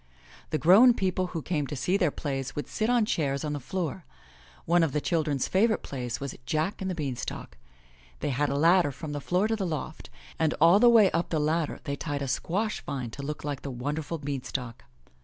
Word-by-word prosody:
The 155 - 0
grown 215 +10 +7
people 185 -2 0
who 165 -4 -5
came 150 -5 -1
to 145 - -5
see 180 +8 0
their 180 -5 +3
plays 135 -2 -4
would 145 - -4
sit 220 +1 -1
on 240 -3 +3
chairs 140 -8 -1
on 150 - -2
the 145 - -3
floor. 175 +5 -4 0.6
One 175 +1 +4
of 160 -5 +1
the 150 - +1
children's 150 -4 0
favorite 215 +4 +2
plays 125 -3 -4
was 140 -1 -5
Jack 155 +8 -1
and 190 - -2
the 185 - -2
Beanstalk. 135 -8 -5 0.6
They - - -1
had 145 +3 0
a 140 - -1
ladder 170 0 +4
from 150 +3 -7
the 145 -1 -4
floor 180 +7 +1
to 225 - 0
the 210 - -3
loft, 155 -1 -5 0.3
and 160 -1 +2
all 170 +5 +6
the 240 - +7
way 220 -5 +6
up 170 +1 -1
the 160 - 0
ladder 155 +1 0
they 140 - -3
tied 145 -3 -3
a - - -3
squash 190 - -1
vine 130 -5 -4
to 140 - -7
look 150 +2 -5
like 145 -2 -4
the 140 - -5
wonderful 145 +6 -3
beanstalk. 130 -5 -5
155 Hz, 215 wpm, -28 LUFS, 140-180 Hz, 0.6 s, grown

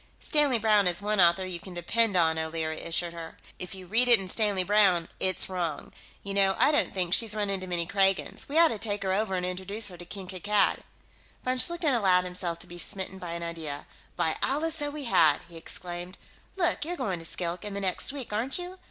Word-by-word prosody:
"Stanley 295 -5 +2
Browne 210 -3 +3
is 175 -1 +1
one 205 0 +1
author 175 +2 +4
you 180 -2 -4
can 180 +1 -10
depend 205 +4 +1
on," 160 -2 +3
O'Leary 160 0 -3
assured 170 +1 -1
her. 165 -1 -9 0.2
"If 180 +1 -6
you 190 -1 -10
read 225 +7 +4
it 240 -3 +7
in 190 - -6
Stanley 200 -1 +1
Browne, 185 -4 +3
it's 185 -1 0
wrong. 175 -5 -4 0.3
You 200 - -5
know, 195 -1 +3
I - - +4
don't 295 - +2
think 180 -2 -1
she's 220 -1 +3
run 205 -2 -1
into 185 -1 -3
many 175 -2 -1
Kragans. 195 +6 0
We 295 - -1
ought 335 -1 +7
to 220 - -4
take 205 -2 -3
her 190 -1 0
over 195 -1 0
and 180 -1 -2
introduce 190 +4 -2
her 180 - -11
to 175 - -9
King 190 +1 -7
Kankad." 200 +3 +1 0.7
Von 255 0 0
Schlichten 340 -1 +3
allowed 190 -6 +3
himself 180 -2 -2
to - - -8
be 175 0 -10
smitten 190 0 -2
by 175 -2 -6
an 170 0 -5
idea. 160 -4 -5 0.3
"By 160 - 0
Allah, 300 +5 +1
so 295 -2 -1
we 295 0 -6
had!" 160 - +4
he 170 - -14
exclaimed. 175 +2 -4 0.4
"Look, 350 -5 0
you're 350 +3 -4
going 185 - -2
to - - -10
Skilk, 175 +2 -4
in 205 -1 -5
the - - -2
next 190 +7 +1
week, 270 -6 -7
aren't 235 +6 0
you? 360 +1 -7
190 Hz, 225 wpm, -28 LUFS, 175-220 Hz, 0.7 s, it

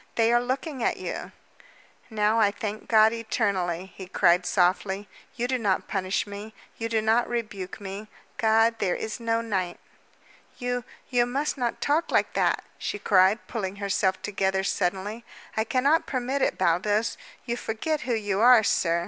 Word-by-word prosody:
"They 230 0 +3
are 240 - +4
looking 260 +2 -3
at - - +1
you!" - - -5 0.8
"Now, 215 0 +2
I 210 -2 +5
thank 210 +1 -5
God 220 0 +5
eternally," 195 -6 -1
he 190 - -8
cried 180 -1 +3
softly, 190 +2 +1 0.3
"You 245 0 -1
do 255 0 0
not 200 -4 0
punish 190 -1 -1
me, 205 +2 -9 0.2
you 230 0 -2
do 220 -1 +1
not 225 +2 +2
rebuke 215 -6 -4
me. 200 +1 -7 0.3
God, 225 0 +3
there 180 -3 +1
is 220 +2 -5
no 230 0 0
night!" 190 -6 -2 0.8
"You 245 -1 -2 0.3
you 240 -1 +3
must 280 +5 -1
not 245 -4 -2
talk 305 +4 +1
like - - +1
that," - - +1 0.2
she - - -3
cried, 195 +1 +3
pulling 195 -4 -3
herself 195 -1 0
together 190 -1 0
suddenly. 200 +4 -2 0.3
"I 220 - +2
cannot 275 +7 +2
permit 260 +1 -1
it, - - +1
Baldos. 195 +5 +1 0.3
You 235 -1 -1
forget 245 +7 -2
who 250 -5 -1
you 205 -3 -1
are, 240 -1 +7
sir." 170 -4 +2
220 Hz, 165 wpm, -26 LUFS, 195-240 Hz, 0.8 s, are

